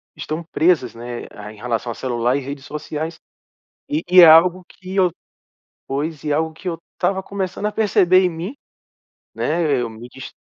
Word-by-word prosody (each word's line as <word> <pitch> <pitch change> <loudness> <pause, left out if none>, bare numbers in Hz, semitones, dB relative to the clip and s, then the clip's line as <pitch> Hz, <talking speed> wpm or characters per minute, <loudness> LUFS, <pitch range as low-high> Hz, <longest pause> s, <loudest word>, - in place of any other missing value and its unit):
estão 155 +2 -5
presas, 170 +1 +2
né, 120 +1 -7
a 105 0 -9
em - - -16
relação 120 +1 -2
a - - -7
celular 120 0 0
e - - +1
redes 140 +1 -7
sociais. 155 +2 -5 0.7
E 155 +3 -1
e 180 +1 +7
é - - +11
algo 175 +3 +6
que 185 +1 -10
eu 185 -3 +3 0.8
pois 145 +2 -3
e 150 - -2
algo 160 +1 0
que 160 - -10
eu 165 - -5 0.2
estava 190 +1 0
começando 195 0 -4
a - - -2
perceber 190 -4 +4
em 180 - +2
mim, 175 +10 -6 0.8
né? 155 -5 0
Eu 120 - -3
me 115 +2 -10
dis 130 +1 -10
160 Hz, 185 wpm, -20 LUFS, 130-180 Hz, 0.8 s, é